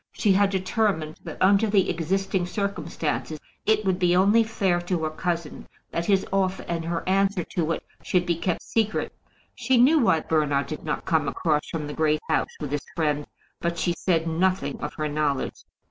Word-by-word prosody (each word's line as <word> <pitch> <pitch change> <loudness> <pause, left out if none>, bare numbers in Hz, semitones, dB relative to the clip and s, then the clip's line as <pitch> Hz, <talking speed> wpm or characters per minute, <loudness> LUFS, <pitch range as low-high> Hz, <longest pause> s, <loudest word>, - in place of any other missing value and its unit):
She 205 - +2
had 200 +1 +4
determined, 190 -5 -1
that 160 - -7
under 200 +3 +4
the 200 -3 +3
existing 185 +2 -1
circumstances, 165 -5 -3 0.3
it 215 -1 +3
would 190 -1 +1
be 180 -1 +3
only 205 +5 +5
fair 195 -5 0
to 175 -2 -2
her 155 - -1
cousin 170 -1 -3 0.2
that 170 0 -2
his 195 -2 +3
offer 190 -1 0
and 165 -1 -2
her 170 +1 -3
answer 195 -1 +2
to 165 -4 0
it - - -5 0.2
should 180 -1 +1
be 170 - +1
kept 170 +1 -2
secret. 220 -2 -1 0.4
She 260 -2 +1
knew 280 +7 +6
why 165 - +3
Bernard 150 -3 +1
did 155 - -6
not 150 - -3
come 155 -3 +1
across 150 +1 0
from 155 -2 -3
the 145 - -5
Great 155 -1 +1
House 160 - 0
with 150 -3 -5
his 145 0 -3
friend, 150 -3 0 0.3
but 170 0 -2
she 175 +1 +1
said 165 -1 0
nothing 185 +4 0
of - - -5
her 155 -1 -2
knowledge. 145 -2 -2
175 Hz, 190 wpm, -25 LUFS, 155-195 Hz, 0.4 s, knew